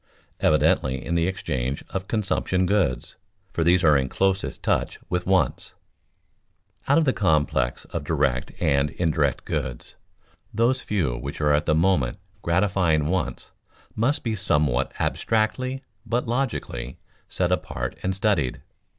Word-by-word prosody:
Evidently 65 -1 +2
in 85 - -2
the 85 0 +2
exchange 65 -8 -2
of 95 0 -4
consumption 95 -3 0
goods, 90 -13 0 0.4
for 85 - 0
these 90 +2 +4
are 75 -2 +6
in 65 -1 +1
closest 95 +3 0
touch - - 0
with 90 0 -1
wants. 95 -9 +1 1.1
Out - - +4
of 165 - +3
the 130 - +3
complex 75 -9 +1
of - - -5
direct 70 -5 0
and 70 +1 +2
indirect 75 -4 0
goods, 65 -2 -4 0.5
those 120 +4 +2
few 85 -13 -1
which - - -6
are 75 -1 +3
at 75 +3 +1
the 75 - +3
moment 80 -8 +2 0.2
gratifying 85 -4 +2
wants 95 +1 -2 0.4
must 140 +7 +1
be 115 -2 -1
somewhat 75 - +1
abstractly, 130 +4 0 0.2
but 120 +2 -1
logically, 115 - -2 0.3
set 90 -1 0
apart 60 -8 -2
and 95 0 -1
studied. 95 -10 0
85 Hz, 135 wpm, -24 LUFS, 70-105 Hz, 1.1 s, are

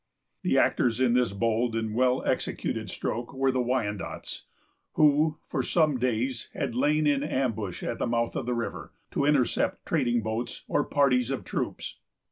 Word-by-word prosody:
The - - +1
actors 120 -1 +2
in 130 -2 +3
this 125 -2 +2
bold 115 +3 0
and 110 -1 -2
well 125 +2 +2
executed - - -1
stroke 120 +4 -4
were 135 0 +2
the 130 - -1
Wyandots, 115 -5 -3 0.5
who, 150 +1 +4
for 135 - -1
some 150 0 +2
days, 125 0 -1
had - - -2
lain 150 +5 +2
in 145 -2 +3
ambush 115 - -2
at - - -3
the - - 0
mouth 115 0 0
of - - -3
the 125 - 0
river, 115 - -4 0.2
to 140 - 0
intercept 145 -4 +1
trading 120 -1 +1
boats 115 +2 -4
or 145 - +1
parties 125 -4 +2
of 135 - -2
troops. - - -4
125 Hz, 165 wpm, -27 LUFS, 115-135 Hz, 0.5 s, who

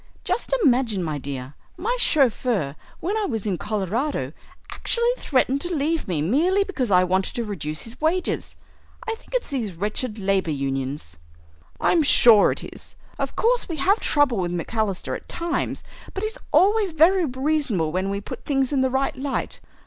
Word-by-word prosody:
Just - - -1
imagine, 245 - +2
my 155 -3 -3
dear, 135 -1 -6 0.2
my 465 +7 -1
chauffeur, 240 - +2 0.3
when 390 +5 -1
I 430 - 0
was 225 - -3
in 190 -4 -1
Colorado, 215 - -2 0.4
actually 470 0 +1
threatened 270 - +1
to 350 0 -1
leave 315 +3 0
me 160 -5 -1
merely 340 - +3
because 295 - -2
I 180 -2 +5
wanted 185 +1 0
to 235 - -1
reduce 155 -8 -4
his 230 +4 -10
wages. 345 +4 -1 0.5
I 450 - 0
think 450 - -9
it's - - -1
these 225 -9 -3
wretched 210 +5 -2
labour 195 -3 0
unions." 135 - -3 0.6
"I'm 340 - +3
sure 235 -7 +6
it - - -4
is. - - -11 0.2
Of - - -3
course 480 -1 +2
we 330 - -2
have 380 +9 +2
trouble 285 -7 +2
with 175 -1 -1
McAlister 195 +3 -2
at - - -10
times, 340 0 -2 0.3
but 390 - -3
he's 435 0 -3
always 405 -2 +4
very 340 +3 +4
reasonable 260 - 0
when 185 +3 -1
we 200 0 -2
put - - -8
things 270 -2 0
in 275 -2 +2
the 260 - +2
right 270 +4 0
light. 270 +1 -3
250 Hz, 170 wpm, -23 LUFS, -, 0.6 s, sure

